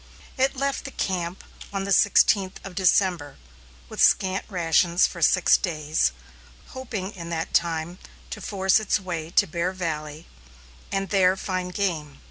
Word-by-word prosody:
It 265 +1 +1
left 275 +1 -2
the - - -4
camp 180 -6 -3 0.3
on 195 -1 -3
the 200 - -4
sixteenth 195 -1 +3
of 195 - -8
December, 180 -4 +1 0.5
with - - -4
scant 190 0 +3
rations 170 -1 +2
for - - -5
six - - +4
days, 155 - 0 0.6
hoping 215 -7 -5
in 170 -5 -9
that 165 -1 -4
time 170 +1 0 0.3
to - - -6
force 190 0 +2
its 215 -1 0
way 170 -5 -5
to - - +3
Bear 170 +3 -2
Valley 155 -4 -5 0.7
and 195 0 -2
there 190 -1 +3
find 185 -1 -3
game. 160 -8 -3
185 Hz, 145 wpm, -24 LUFS, 165-195 Hz, 0.7 s, six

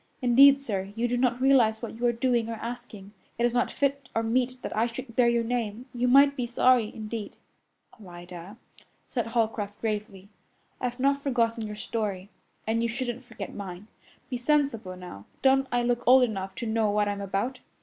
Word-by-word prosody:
Indeed, 275 +2 +7
sir, 200 -7 -4
you 235 +1 0
do 245 - -1
not 245 0 +1
realize 250 -4 +3
what 235 - -5
you 240 +2 0
are - - +4
doing 235 -1 0
or 230 - -3
asking. 225 -3 -8 0.2
It 235 - +2
is 240 - +1
not 245 0 +1
fit 280 -1 -1
or 225 - +1
meet 250 +2 0
that - - -4
I 225 +2 +2
should 235 0 -8
bear 245 -2 +4
your 235 -1 +1
name. 230 -1 -3
You 245 0 0
might 280 +2 +6
be 250 -3 -2
sorry, 245 -2 +3
indeed." 215 -1 -6 0.6
"Alida," 175 +2 -10 0.5
said 240 -3 -2
Holcroft 220 -3 -1
gravely, 210 -3 -4 0.5
"I've 245 0 -3
not 280 +1 +2
forgotten 230 -4 0
your 210 - -6
story, 210 -3 -4 0.3
and 225 +1 0
you 235 - 0
shouldn't 245 +1 -4
forget 235 -3 -8
mine. 195 +1 -8 0.4
Be 250 - -3
sensible 245 -8 0
now. 180 - -10 0.2
Don't 270 0 +4
I 245 0 +1
look 240 0 0
old 255 +1 +7
enough 195 -5 -3
to - - -5
know 220 -1 +1
what 205 0 +1
I'm 200 0 -3
about?" 200 +7 -2
235 Hz, 190 wpm, -27 LUFS, 210-250 Hz, 0.6 s, Indeed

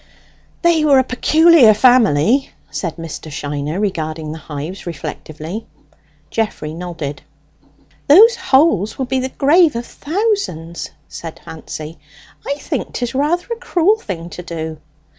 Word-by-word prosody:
"They 335 -2 +4
were 285 -3 +5
a 260 - +5
peculiar 295 -1 +5
family," 245 - +4 0.2
said 170 -4 -3
Mr. 165 -1 -8
Shiner, 145 +3 -3
regarding 160 -6 -3
the 160 - -7
hives 155 +6 -7
reflectively. 160 +4 -6 0.6
Geoffrey 210 -9 -2
nodded. 165 -5 -6 0.9
"Those 435 +11 +8
holes 265 - +2
will 265 - -1
be 260 +1 -1
the 260 +1 -2
grave 305 +2 +4
of 235 +1 -3
thousands!" 310 - -2 0.2
said 165 -1 -8
Fancy. 155 0 -8 0.5
"I 280 - 0
think 285 -1 -4
'tis 245 0 -3
rather 300 +6 0
a - - 0
cruel 405 0 +2
thing 170 - -6
to - - -7
do." 160 -2 -6
210 Hz, 130 wpm, -18 LUFS, -, 0.9 s, Those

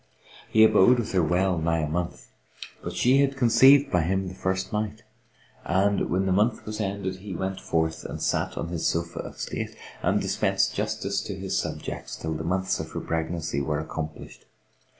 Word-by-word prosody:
He 110 - +6
abode 110 +2 +6
with 120 - -2
her 95 - +3
well 90 +2 +1
nigh 80 0 +1
a 75 - -1
month 85 +3 -4 0.5
but 85 - -5
she 125 +9 +4
had 135 -1 +1
conceived 135 +3 +6
by 90 - +3
him 95 +3 0
the 90 - -6
first 95 +1 -2
night; 110 +1 -2 0.6
and, 100 +3 +1
when 95 +2 +1
the 95 - +1
month 105 +5 +1
was 110 0 -4
ended, 95 -2 -3
he 95 -1 -7
went 95 +1 -3
forth 80 -1 -1
and - - -6
sat - - -1
on 85 - -3
his 85 -2 -1
sofa 85 0 -2
of - - -7
state, - - -4 0.3
and - - +2
dispensed - - +1
justice 105 -1 -2
to 100 - -5
his 95 0 -3
subjects, - - -4
till 80 0 -4
the 80 +1 -4
months 95 +3 0
of 80 0 -6
her - - -2
pregnancy 80 -3 -2
were 75 +1 -1
accomplished. 80 -1 -7
95 Hz, 190 wpm, -26 LUFS, 85-105 Hz, 0.6 s, He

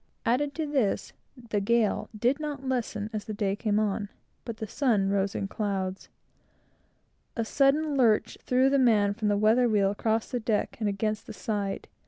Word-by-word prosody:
Add 280 +5 +1
to 320 - -2
this, 270 -9 0 0.2
the 230 -4 -3
gale 225 +1 +1
did 245 +6 +1
not 290 -3 -5
lessen 220 -4 -2
as 215 -1 -4
the 215 - -5
day 200 -2 0
came 210 -1 0
on, 210 -1 0 0.4
but 230 -2 -5
the 220 - -4
sun 215 -5 +1
rose 200 0 0
in 195 - -2
clouds. 195 -2 -3 1.3
A 230 - -1
sudden 285 +4 +2
lurch 230 -5 +3
threw 255 +1 +3
the 275 - +3
man 210 -5 +4
from 215 0 -2
the 205 -1 +2
weather 225 +4 +4
wheel 200 -2 +3
across 220 +2 -1
the 245 - -1
deck 220 -2 -1
and 215 -2 0
against 215 +2 -2
the 225 - -7
side. 200 0 -3
220 Hz, 180 wpm, -28 LUFS, 205-250 Hz, 1.3 s, man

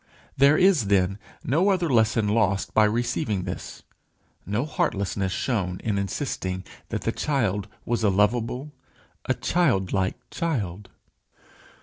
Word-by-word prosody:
There 140 +3 +5
is, 180 - +4
then, 95 0 +2 0.2
no 165 +10 +2
other 180 -3 +2
lesson 110 -4 +3
lost 100 -3 +1
by 110 - +5
receiving 115 - 0
this; 90 -1 -7 0.6
no 105 +7 0
heartlessness 100 -8 -1
shown 95 -5 -1
in 105 -3 0
insisting 95 -3 -3 0.3
that - - -3
the - - 0
child 105 -9 -1 0.2
was 120 -1 -1
a 105 - +4
lovable 115 +8 +1 0.5
a - - +1
childlike 95 - +1
child. 105 - -3
110 Hz, 120 wpm, -25 LUFS, 100-135 Hz, 0.6 s, There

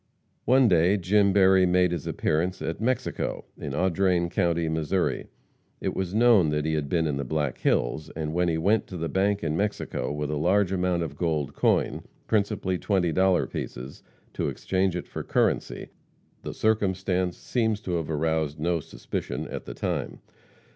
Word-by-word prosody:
One 130 +1 +5
day 90 +1 +4
Jim 100 +2 +3
Berry 95 -1 +5
made 90 0 +3
his 85 -4 -4
appearance 85 +4 0
at 80 +5 -4
Mexico, 130 +3 -2
in 70 - -6
Audrain 90 0 +1
county, 85 -1 +1
Missouri. 80 +3 -1 0.5
It - - -3
was 95 +1 -3
known 110 -8 +5
that 75 0 -1
he 80 - 0
had 75 -2 -1
been 85 -2 +1
in 75 -3 -1
the 70 - -2
Black 75 0 -2
Hills, 75 +6 0
and 80 -1 -3
when 90 +1 +1
he 80 -1 +1
went 100 +7 +2
to 90 - -7
the 85 0 -2
bank 100 +2 0
in 80 -1 -1
Mexico 100 -9 -2
with 75 0 -3
a 75 - -1
large 95 +5 +2
amount 90 -2 0
of 75 -3 -6
gold 75 -4 -1
coin, - - +1 0.2
principally 100 -4 0
twenty 95 -5 +1
dollar 95 +1 +3
pieces, 65 +3 -7 0.3
to - - -1
exchange 95 -1 -1
it 90 - -4
for - - -5
currency, - - -1 0.5
the - - -6
circumstance 95 -4 0
seems 110 -4 -1
to 90 -4 -2
have 80 -2 -4
aroused 80 -1 -1
no 85 +2 0
suspicion - - -5
at - - -6
the - - -7
time. - - -3
90 Hz, 175 wpm, -26 LUFS, 80-95 Hz, 0.5 s, One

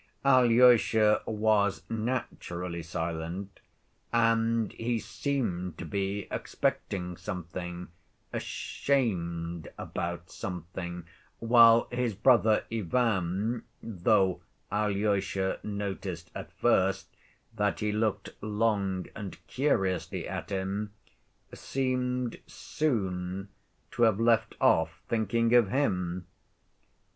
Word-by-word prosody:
Alyosha 120 -4 +5
was 105 -2 +2
naturally 90 -7 -3
silent, 85 +3 -4 0.5
and 115 -1 +2
he 115 +1 -1
seemed 95 - -2
to - - -6
be 100 +2 -2
expecting 90 -2 -2
something, 90 0 -6 0.5
ashamed 85 - -1
about 85 +1 -4
something, 90 -1 -6 0.3
while 115 0 +6
his 120 -3 -1
brother 110 -1 +4
Ivan, 110 0 0 0.2
though 95 -2 +2 0.3
Alyosha 100 -2 0
noticed 95 -5 -4
at - - -7
first 95 +1 +1 0.4
that 105 -1 0
he 105 0 +1
looked 105 -2 -1
long 105 -3 0
and 100 -3 -6
curiously 95 - 0
at 90 -2 -5
him, 100 +2 -2 0.6
seemed 125 -2 -1
soon 95 - -2 0.4
to - - -4
have 110 -3 +4
left 115 -2 +2
off 80 0 +3
thinking 115 +1 +1
of 120 -5 +6
him. 90 -9 0
100 Hz, 90 wpm, -29 LUFS, 90-115 Hz, 0.6 s, while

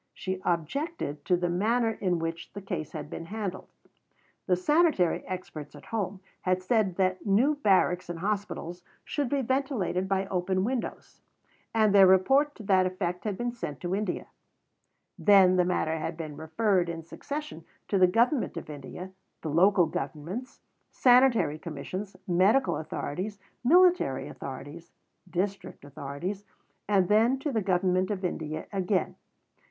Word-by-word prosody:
She 190 0 -4
objected 170 - -2
to 180 - +3
the 175 0 0
manner 225 +6 +1
in 185 -5 -1
which 165 0 -5
the 200 - -7
case 160 -6 -4
had 150 -2 -5
been 165 - -7
handled. 200 -1 -5 0.8
The 185 - +4
sanitary 295 - +2
experts 155 -6 -7
at 145 - -13
home 205 -4 -3 0.2
had 185 0 0
said 200 -3 +1
that 185 -1 0
new 230 +9 +3
barracks 190 -9 +2
and 175 - -4
hospitals 195 -2 -3 0.2
should 285 -4 -2
be 275 0 0
ventilated 235 -8 -1
by 195 0 +1
open 185 0 0
windows, 245 +2 -4 0.5
and 215 -2 +3
their 195 -2 +8
report 270 +11 +4
to 220 - -10
that 190 -2 +3
effect 180 0 -3
had 205 -3 -2
been 240 0 -2
sent 150 - -6
to 175 +1 -2
India. 200 -2 -2 0.9
Then 190 -3 +6
the 180 - +4
matter 160 -3 0
had 165 +1 -4
been 155 -3 -6
referred 175 +3 +1
in 165 -1 -5
succession 285 - -6 0.2
to 195 - +1
the 185 - +7
Government 235 - +1
of 160 - -6
India, 150 +6 -8 0.3
the 155 - -3
local 180 +3 +5
governments, 160 - -5 0.3
sanitary 245 - +4
commissions, 185 +6 -6
medical 195 - +3
authorities, 170 +6 -4 0.3
military 345 - +4
authorities, 145 +5 -9 0.4
district 190 -3 -3
authorities, 145 +8 -5 0.5
and 195 -3 +3
then 225 +6 +4
to 285 +2 -3
the 225 -4 0
Government 185 -1 +1
of 195 -3 -2
India 155 -3 -3
again. 190 0 0
185 Hz, 145 wpm, -28 LUFS, 170-215 Hz, 0.9 s, their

